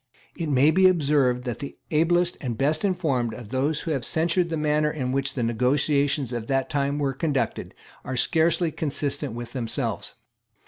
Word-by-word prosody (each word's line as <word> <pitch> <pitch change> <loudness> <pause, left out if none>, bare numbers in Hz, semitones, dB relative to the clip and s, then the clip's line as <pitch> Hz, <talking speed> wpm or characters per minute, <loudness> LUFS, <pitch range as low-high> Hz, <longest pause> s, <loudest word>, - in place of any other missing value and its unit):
It 165 -2 -3
may 140 +2 +4
be 185 +3 +5
observed 140 -8 +2
that 120 -3 -4
the 140 - -7
ablest 175 +3 +2
and 120 -5 -3
best 150 - +1
informed 150 - 0
of 120 -4 -10
those 140 +5 0
who 165 - -3
have 135 -5 -1
censured 170 +5 +1
the 165 - -2
manner 150 0 +1
in 130 -5 -3
which 135 0 -1
the 125 - -1
negotiations 135 +3 +1
of 115 -2 -4
that 135 +2 0
time 140 -1 0
were 140 -2 0
conducted 140 0 -2 0.3
are 130 0 -4
scarcely 165 +3 +2
consistent 145 -6 -2
with 120 0 -7
themselves. 120 -4 -3
140 Hz, 175 wpm, -25 LUFS, 130-160 Hz, 0.3 s, be